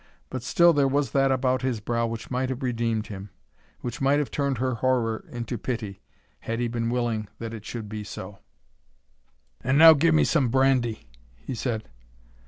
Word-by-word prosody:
But 130 - -4
still 170 +7 +4
there 140 -2 +3
was 140 +1 0
that 135 -1 +3
about 130 -1 +1
his 130 -4 -1
brow 115 +2 -1
which 115 +1 -6
might 130 +1 -1
have 130 +1 -4
redeemed 115 -3 -1
him,—which 95 - -10
might 135 +2 +3
have 145 -2 -1
turned 140 -3 0
her 130 +2 0
horror 115 -2 0
into 120 -1 -5
pity, 110 -6 -4 0.4
had 115 +1 -4
he 120 - 0
been 115 0 -2
willing 120 -3 -1
that 115 0 -6
it 110 -2 -8
should 115 -1 -6
be 105 0 -5
so. 95 0 -8 1.2
"And 130 +3 +2
now 160 +1 +10
give 160 +2 +3
me - - +5
some 140 -7 +2
brandy," 130 -3 +1 0.3
he 130 - -7
said. 115 -2 -3
120 Hz, 180 wpm, -26 LUFS, 115-135 Hz, 1.2 s, now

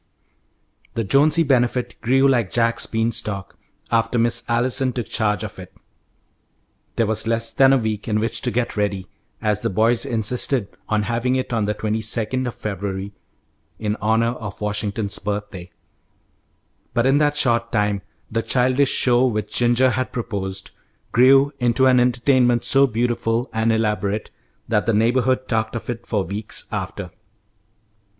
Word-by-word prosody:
The 115 - 0
Jonesy 150 +9 +3
Benefit 125 -3 +1
grew 135 +3 +3
like 120 -7 +1
Jack's 115 -1 0
bean 115 +1 0
stalk 100 -4 -4 0.3
after 115 +1 +1
Miss 115 0 +2
Allison 130 +2 +1
took 120 -2 -4
charge 105 -3 0
of - - -7
it. - - -10 1.2
There 115 - +2
was 110 +1 -1
less 115 0 +1
than 135 0 +5
a 135 - +5
week 110 -3 -3
in 105 -1 +1
which 115 +2 -1
to 125 - 0
get 120 0 -2
ready, 100 -3 -1 0.4
as 105 -1 +1
the - - -1
boys 110 +4 +2
insisted 115 0 0 0.2
on 110 -1 +1
having 120 +4 0
it 130 -1 -2
on 110 -3 +1
the 105 +1 -1
twenty 110 +1 -2
second 115 +4 -1
of 120 - -5
February, 100 -1 -4 0.6
in 105 -1 -2
honour 115 +2 +1
of 105 -3 -7
Washington's 105 0 -2
birthday; 100 -3 -5 1.3
but 120 - +2
in 135 +2 +4
that 150 -1 +2
short 115 -4 +1
time 105 -2 0 0.3
the 115 - 0
childish 130 +3 +2
show 125 0 +3
which 105 -3 -3
Ginger 120 +2 +3
had 130 +1 -2
proposed 100 -6 -4 0.4
grew 135 +4 +5
into 120 +1 +2
an 130 -1 +5
entertainment 125 0 +2
so 135 0 +4
beautiful 115 0 -1
and 110 0 +1
elaborate 105 -2 -1 0.4
that 110 -1 0
the 115 - +3
neighbourhood 125 +3 +2
talked 110 0 -1
of 115 - -4
it 115 -1 -8
for 105 -4 0
weeks 105 +5 -4
after. 95 -2 -5
115 Hz, 155 wpm, -21 LUFS, 105-125 Hz, 1.3 s, than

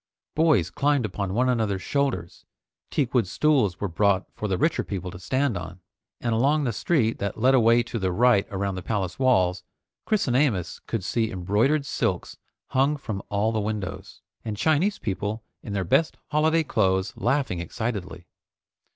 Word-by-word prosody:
Boys 150 - +3
climbed 145 -4 +1
upon 100 -2 -3
one 125 +2 +2
another's 110 -6 0
shoulders, 135 -12 -2 0.5
teakwood 125 -6 +1
stools 130 - +2
were 100 - -1
brought 100 +2 +2
for 105 - -4
the 95 -2 0
richer 160 - +1
people 95 -3 -5
to 90 - -10
stand 130 +4 0
on, 90 +1 -6 0.4
and 120 -1 -1
along 140 +7 +2
the 120 -4 -1
street 115 -2 +1
that 100 -1 -3
led 130 +4 +4
away 120 -1 +5
to 115 - -5
the 95 -2 0
right 115 +1 +3
around 100 0 -2
the 95 - -5
palace 95 -1 -3
walls, 90 -9 +2 0.4
Chris 215 -6 +1
and 125 - +1
Amos 115 - +1
could 115 -5 -2
see 110 +3 0
embroidered 110 +10 +1
silks - - -2 0.3
hung 140 +2 +2
from 105 -8 -5
all 105 +2 +1
the 110 - -1
windows, 100 -2 -5 0.2
and 105 -2 -4
Chinese 160 - +2
people 105 +3 -3 0.2
in 105 - -7
their 100 -2 0
best 155 - +2
holiday 160 +2 +3
clothes 95 -7 +1
laughing 130 -8 0
excitedly. 95 -1 -4
110 Hz, 170 wpm, -25 LUFS, 95-135 Hz, 0.5 s, away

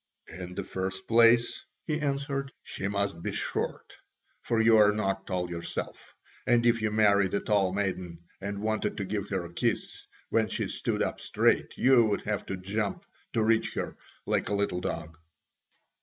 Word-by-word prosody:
"In 90 +1 -7
the 100 - -3
first 95 +1 -4
place," 115 +1 +4 0.2
he 155 -1 -1
answered, 140 -1 -2
"she 95 - -4
must 100 -4 -1
be - - -2
short, - - -3 0.5
for 115 - 0
you 115 0 +6
are 105 -1 +7
not 95 -2 -2
tall 90 -2 -1
yourself, 85 -1 -6 0.3
and 120 -1 +4
if 115 -1 +3
you 110 - +1
married 100 -3 +3
a - - +2
tall 100 -3 +2
maiden 90 -4 -3 0.2
and 100 +1 -4
wanted 110 0 -1
to 100 - -2
give 100 +1 -3
her 95 -3 -2
a 85 - -11
kiss - - -2 0.2
when 110 -1 +3
she - - -2
stood - - -1
up - - -3
straight, - - +1
you 130 -2 +6
would 105 -2 0
have 105 -1 -2
to 95 - -3
jump 100 +2 -2 0.3
to 110 - +2
reach 110 0 +2
her - - -3 0.3
like - - 0
a 105 - +1
little 100 -3 0
dog." 80 -2 -5
100 Hz, 175 wpm, -29 LUFS, 95-115 Hz, 0.5 s, are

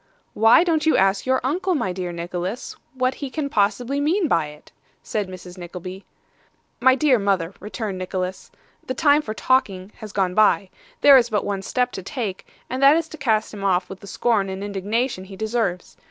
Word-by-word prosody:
'Why 225 +9 +6
don't 320 -3 +1
you 315 - +4
ask 195 +3 +2
your 260 0 +3
uncle, 360 +7 0
my 190 -11 -1
dear 180 -1 -4
Nicholas, 175 +5 -5 0.2
what 255 0 +1
he 280 0 -6
can 285 +1 -3
possibly 235 +6 0
mean 335 +5 +1
by 165 - +1
it?' 150 0 -14 0.3
said 210 -3 -2
Mrs. 180 0 -10
Nickleby. 180 +2 -8 0.7
'My 260 +1 +5
dear 270 -3 +3
mother,' 195 -3 0
returned 210 -1 -5
Nicholas, 185 0 -4 0.4
'the 255 - -3
time 290 +2 +4
for 215 -7 -6
talking 205 -7 0
has 215 -3 -9
gone 190 -2 0
by. 205 -2 +3 0.3
There 280 -2 +9
is 240 -2 +3
but 210 -3 0
one 200 -1 -2
step 250 +5 -1
to - - -6
take, 200 -1 -5 0.2
and 255 +2 -4
that 280 +2 +7
is 330 -1 -1
to 315 - -9
cast 220 -7 0
him 200 -2 -7
off 185 -2 +1
with 190 - -8
the 200 - -12
scorn 205 -3 0
and 190 +1 -5
indignation 205 +2 -2
he 195 0 -10
deserves. 215 -3 -2
210 Hz, 195 wpm, -22 LUFS, 190-260 Hz, 0.7 s, There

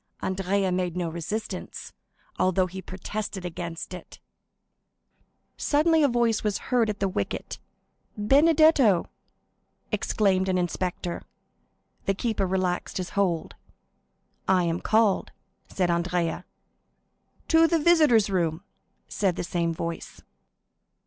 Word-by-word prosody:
Andrea 190 0 0
made 180 -1 -1
no 175 -2 -1
resistance, 170 +7 -5 0.5
although 185 0 +3
he 190 +1 -7
protested 190 +1 -5
against 170 0 -6
it. 180 -2 -10 1.4
Suddenly 315 +2 +3
a 290 - +5
voice 235 -3 +1
was 210 -2 0 0.2
heard 235 -3 +3
at 210 - -3
the 195 - +1
wicket. 100 - -4 0.6
"Benedetto!" 275 - +4 0.8
exclaimed 190 -3 +1
an 185 - +1
inspector. 175 0 -2 0.9
The 195 - +2
keeper 215 -3 -1
relaxed 185 -1 -1
his 185 -2 -4
hold. 180 -5 0 0.9
"I 185 -1 +3
am 170 +1 -1
called," 215 -3 +2 0.4
said 180 -2 0
Andrea. 170 -1 -1 1.0
"To 325 0 +6
the 335 - +2
visitors' 300 - +4
room!" 170 -2 0 0.4
said 190 -4 0
the - - -3
same 170 -1 -1
voice. 165 0 -5
190 Hz, 110 wpm, -26 LUFS, 175-220 Hz, 1.4 s, To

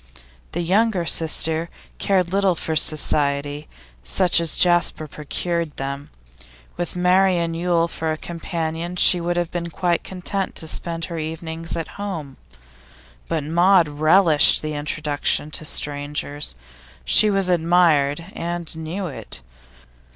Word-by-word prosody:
The 175 - -2
younger 190 +1 +1
sister 160 0 +2 0.3
cared 185 -2 0
little 195 -2 +2
for 160 0 -3
society 145 -1 +1 0.4
such 180 -3 +2
as 165 -2 0
Jasper 175 -3 +2
procured 165 +2 -3
them; 140 +1 -5 0.7
with 175 0 -4
Marian 180 -1 +2
Yule 170 0 +1
for 160 -1 -3
a 155 - -3
companion 170 +1 -5
she 180 0 +5
would 175 +1 -2
have 175 -1 -1
been 170 -1 -4
quite 175 0 -1
content 190 +1 -3
to 160 - -3
spend 165 +1 -3
her 170 -2 -6
evenings 160 +1 -4
at 165 - -4
home. 165 -9 -6 0.9
But 160 -3 -2
Maud 175 +3 +4
relished 155 +2 +4
the 155 0 -3
introduction 150 0 -2
to 155 - -5
strangers. 145 - -1 0.5
She 215 - +5
was 195 -2 +2
admired, 165 -4 +2
and 170 -1 -4
knew 160 +5 -5
it. 135 - -7
165 Hz, 130 wpm, -21 LUFS, 155-175 Hz, 0.9 s, she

